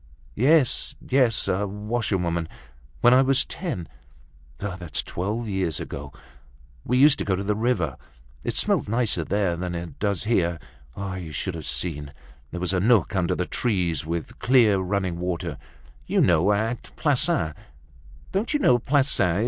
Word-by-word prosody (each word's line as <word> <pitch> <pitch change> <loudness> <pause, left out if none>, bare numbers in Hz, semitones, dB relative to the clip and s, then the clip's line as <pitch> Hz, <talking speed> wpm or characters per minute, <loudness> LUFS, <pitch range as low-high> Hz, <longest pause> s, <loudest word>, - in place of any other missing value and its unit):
"Yes, 135 - +3
yes, 125 -7 +2
a 100 +2 0
washerwoman—When 90 - -1
I 130 - +6
was 135 +1 +3
ten—That's 70 - -6
twelve 105 +6 -3
years 95 -6 -1
ago—We 70 - -7
used 145 +2 +6
to - - -1
go 95 - 0
to 95 - -3
the 105 +1 0
river—It 75 - -3
smelt - - +2
nicer 110 -6 +1
there 95 0 0
than 90 0 -4
it 85 0 -7
does 100 -4 0
here—You 85 - -3
should 90 +5 -3
have 80 -3 -6
seen, 75 -5 -1 0.4
there 90 - -6
was 90 +1 0
a 90 - +2
nook 105 -2 +3
under 90 -2 +1
the 90 - -1
trees, 90 - 0
with 85 +1 -5
clear 115 -6 +4
running 95 -2 -2
water—You 90 -1 -5
know, 85 +3 +4
at 110 +4 0
Plassans—Don't 125 - -2
you - - +2
know 125 - +4
Plassans? 130 - +2
95 Hz, 130 wpm, -24 LUFS, 80-115 Hz, 0.4 s, I